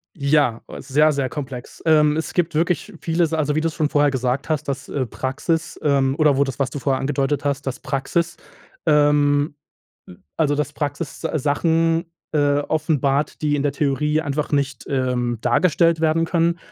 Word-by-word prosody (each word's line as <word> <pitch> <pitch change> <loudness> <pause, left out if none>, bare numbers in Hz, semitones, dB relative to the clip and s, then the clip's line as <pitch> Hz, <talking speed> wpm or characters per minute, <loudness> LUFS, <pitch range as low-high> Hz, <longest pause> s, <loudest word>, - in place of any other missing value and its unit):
Ja, 140 -6 +2 0.2
sehr, 150 +3 +3
sehr 140 -2 -1
komplex. 130 -3 -7
Ähm, 150 -1 +4
es 160 - -3
gibt 170 -2 0
wirklich 170 +5 0
vieles, 165 -1 0
also, 150 -2 0
wie 155 - +1
du's 165 -1 -2
schon 155 -3 0
vorher 145 -1 +3
gesagt 130 +2 -1
hast, 150 -2 0
dass, 140 -1 -4
äh, 135 -2 -1
Praxis 150 +7 -3
ähm, 140 -2 +2
oder 150 -4 +3
wo 140 - +4
das, 135 -2 -6
was 135 -1 +1
du 145 - -6
vorher 135 -1 0
angedeutet 140 +1 -1
hast, 140 -1 -1
das 135 +2 -3
Praxis 155 +4 -2 0.5
ähm, 145 -1 +3 0.8
also, 150 -3 +2
dass 145 0 -2
Praxis 145 +1 -4
Sachen, 165 +3 +1 0.3
äh, 145 -2 +2
offenbart, 150 -2 0
die 150 -1 +1
in 140 - -1
der 145 - 0
Theorie 150 +2 0
einfach 150 0 -3
nicht, 140 -3 -1
ähm, 125 -3 0
dargestellt 165 +5 +3
werden 165 +1 +2
können. 170 0 +1
145 Hz, 170 wpm, -21 LUFS, 140-155 Hz, 0.8 s, Ähm